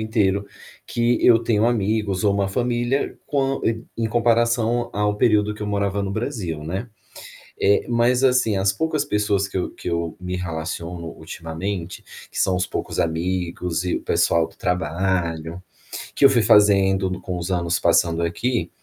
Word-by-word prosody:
inteiro 100 -3 0 0.4
que 120 0 +1
eu 115 -2 +7
tenho 115 -1 +2
amigos 105 -3 0
ou 100 - +4
uma 100 -1 0
família, 120 +4 -1
quão 135 -2 0
em 115 0 -1
em 115 -1 -1
comparação 120 0 +2
ao 105 0 0
período 105 -1 +2
que 105 - -8
eu - - -3
morava 100 -1 -1
no 95 - -3
Brasil, 100 - -4
né. 95 +9 -4 0.7
Eh, 100 +1 +3
mas 120 +2 +2
assim, 125 -5 +3
as 95 0 +2
poucas 155 +3 0
pessoas 105 -5 0
que 95 - -5
eu 90 - -2
que - - -6
eu 85 +2 -2
me 90 0 -4
relaciono 85 0 -5
ultimamente, 85 +3 -6 0.3
que - - -4
são 95 - +2
os 90 0 -1
poucos - - -4
amigos 85 0 -1
e 90 - -1
o - - -4
pessoal 85 -1 +2
do - - -21
trabalho, 85 -1 -1 0.5
que 140 - +4
eu - - +9
fui 125 -4 +3
fazendo 95 -3 +4
com 90 -2 -4
os 90 +2 -4
anos 85 -1 0
passando 85 -1 +2
aqui, 115 +9 -1
100 Hz, 165 wpm, -22 LUFS, 90-115 Hz, 0.7 s, eu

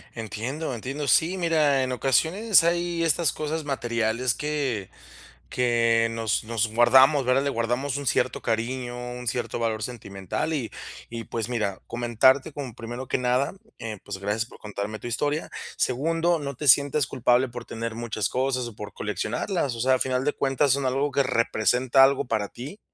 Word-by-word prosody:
Entiendo, 120 +7 -4
entiendo. 135 +5 -4
Sí, 170 +8 +3
mira, 155 -6 +2
en 130 - -2
ocasiones 165 - +3
hay 170 0 0
estas 165 -1 +2
cosas 155 +1 -3
materiales 115 -2 0
que 140 -10 -2 0.6
que 115 -2 +2
nos 115 -2 -1
nos 115 -1 0
guardamos, 130 +4 +6
¿verdad? 130 +2 +2
Le 140 - 0
guardamos 120 +4 -1
un 140 -2 -5
cierto 125 - +1
cariño, 120 +2 -2 0.2
un 125 -1 -8
cierto 120 0 -2
valor 110 -2 -1
sentimental 100 - -4
y 130 -7 -3 0.4
y, 115 -1 -6
pues, 115 0 -4
mira, 105 -5 -2
comentarte 120 +5 +2
como 135 -5 -6
primero 120 +3 -7
que - - 0
nada, 125 +2 +1 0.2
eh, 110 -3 -6
pues, - - -6
gracias 105 +4 -2
por - - -15
contarme 105 +1 -5
tu - - -12
historia. 145 +6 -1 0.3
Segundo, 165 +6 +1
no 140 -2 -5
te 150 +3 -4
sientas 140 +1 +5
culpable 125 0 +2
por 120 -1 -8
tener 115 0 -5
muchas 110 -3 -2
cosas 130 -1 -1
o 115 - -10
por 105 0 -8
coleccionarlas, 120 - -2
o 115 - -7
sea, 130 +2 +3
a 130 - -2
final 130 0 0
de 150 - +1
cuentas 135 0 +1
son 140 -1 -1
algo 140 +3 0
que 140 - +2
representa 125 +2 +3
algo 140 +1 +3
para 110 -4 -1
ti 145 - -9
125 Hz, 175 wpm, -25 LUFS, 115-140 Hz, 0.6 s, guardamos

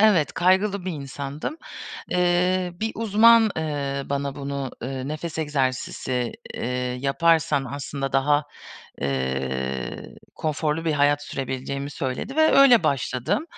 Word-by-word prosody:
Evet 200 -8 +4
kaygılı 190 +2 +2
bir 185 - -2
insandım. 140 - -5 0.5
Iıı, 180 0 +1
bir 220 +1 -1
uzman, 225 +1 +5
ııı, 140 -3 -3
bana 140 -1 -1
bunu, 140 -2 -4
ııı, 130 +1 -4
nefes 155 +2 -5
egzersizi, 130 -4 -1 0.2
ııı, - - -4 0.4
yaparsan 150 0 +2
aslında 135 0 -4
daha, 145 +2 +3 0.6
ııı, 65 -1 -2 0.2
konforlu 155 +1 -1
bir 160 - +1
hayat 145 0 +3
sürebileceğimi 135 +1 -4
söyledi 135 - -4
ve 315 0 +5
öyle 250 -9 +7
başladım. 140 - 0
145 Hz, 115 wpm, -24 LUFS, 135-180 Hz, 0.6 s, öyle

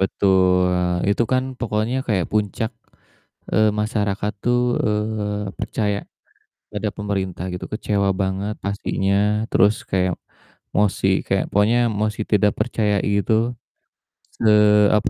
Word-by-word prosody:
Betul, 95 -1 +3 0.4
itu 100 - +2
kan 130 0 +3 0.2
pokoknya 110 +2 -1
kayak 95 -7 0
puncak, 105 +1 -1 0.8
eee, 110 -1 +4
masyarakat 105 -1 -1
tuh, 120 0 +2 0.3
eee, 105 -1 -2
percaya 105 -2 -1 0.7
pada - - -2
pemerintah 95 -4 -3
gitu, 90 - -5
kecewa 100 -2 0
banget 95 +2 -2
pastinya, 100 -1 -1 0.4
terus 105 +3 +4 0.2
kayak 95 -1 +1 0.6
mosi 100 -1 +2 0.2
kayak 95 - +1
pokoknya 105 +4 +3 0.2
mosi 110 0 -1
tidak 105 0 +4
percaya 110 -2 0
itu, 100 +2 +1 1.0
se 110 - +2 0.5
apa 105 - 0
105 Hz, 110 wpm, -21 LUFS, 95-110 Hz, 1.0 s, eee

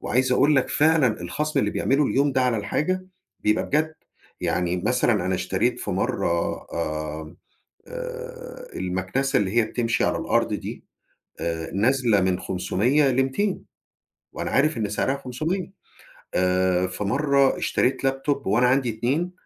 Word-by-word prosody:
وعايز 130 +1 +1
أقول 140 +3 +4
لك 135 - +2
فعلًا 150 - +3
الخصم 150 - -2
اللي 105 0 0
بيعملُه 140 +2 +1
اليوم 140 +1 +2
ده 130 0 +2
على 125 -3 +2
الحاجة 185 - -1 0.3
بيبقى 105 +1 +1
بجد. 155 +2 0 0.5
يعني 90 0 0
مثلًا 110 -1 +1
أنا 95 - +1
اشتريت - - 0
في - - -4
مرّة، 85 0 0 0.2
آآ، 80 0 -4 0.5
آآ، - - -7
المكنسة 95 +10 -1
اللي 100 +2 -1
هي 120 - +6
بتمشي 115 +1 0
على - - +1
الأرض - - +1
دي - - -6 0.6
آآ، 80 -1 -3
نازلة 115 -1 +3
من 95 -1 +1
500 125 +10 +1
ل200، 135 +10 0 0.7
وأنا - - -4
عارف 155 0 +2
إن 105 -2 -1
سعرها 130 +6 0
500. 165 +10 -3 0.6
آآ، 90 0 +2
في 105 - -5
مرّه 140 +5 +2
اشتريت 135 +1 +1
laptop 135 +1 -1
وأنا 115 +6 +3
عندي 130 0 +2
2 135 +11 -1
125 Hz, 140 wpm, -24 LUFS, 95-145 Hz, 0.7 s, هي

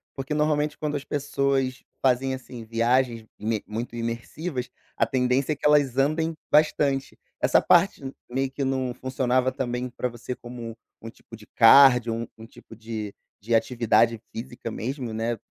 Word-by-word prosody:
Porque 135 +2 -4
normalmente 150 0 +1
quando 150 -1 -3
as 140 - -3
pessoas 140 -2 -1 0.2
fazem, 130 0 +2
assim, 125 -2 -10
viagens 115 +1 +1
ime 110 0 -2
muito 115 +2 -5
imersivas, 120 +4 -4 0.3
a 115 - +2
tendência 125 +4 +1
é - - -6
que - - -8
elas 145 -4 +4
andem 155 +4 +1 0.2
bastante. 145 -3 +2 0.2
Essa - - +4
parte 175 -1 +3 0.3
meio 135 +1 -1
que 140 - -3
não 130 -2 -1
funcionava 130 0 0
também 125 -1 -3
pra 125 +1 -3
você 120 +1 -6
como 120 -2 -9 0.2
um 115 - -7
tipo 115 - -14
de 105 -1 -16
cardio, 125 -1 +6
um 115 0 -4
um 110 - -11
tipo 115 - -15
de 110 -2 -6 0.3
de 115 +3 -2
atividade 115 -1 +2
física 115 -1 -7
mesmo, 125 0 -4
né, 115 +1 -2
125 Hz, 160 wpm, -25 LUFS, 115-135 Hz, 0.3 s, cardio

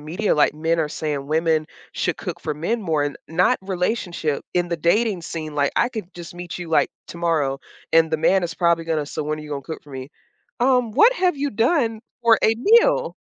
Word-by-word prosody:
media 175 +8 -1
like 150 - +3
men 165 +2 0
are 155 - -1
saying 150 -2 -4
women 160 0 +1 0.3
should - - -1
cook - - -6
for 150 - -3
men 215 +10 -2
more 155 -5 0
and 145 - -4
not 180 +9 +3
relationship 180 -5 -2
in 175 -1 +1
the 170 - -1
dating 185 +4 +1
scene, 155 -2 -6
like, 140 -1 +1
I - - +3
could 215 -7 -7
just 175 0 -10
meet 175 0 -7
you, 175 -2 -7
like, 160 - +2 0.2
tomorrow, 160 -6 -1 0.3
and 165 0 +4
the 160 - +1
man 185 +4 +3
is 170 -1 -3
probably 170 -1 +1
gonna 160 -3 -1
say, - - -10
"So - - -3
when 155 +1 -3
are - - -8
you 150 - -10
gonna 140 -1 -4
cook 160 +4 -7
for 145 - -15
me?" 130 0 -7 0.5
Um, 250 -2 +2
"What 445 - +5
have 365 -9 +1
you 285 +1 -1
done 230 -1 +1 0.2
for 230 -1 +6
a 220 - +5
meal?" 465 - +4
170 Hz, 220 wpm, -22 LUFS, 155-220 Hz, 0.5 s, for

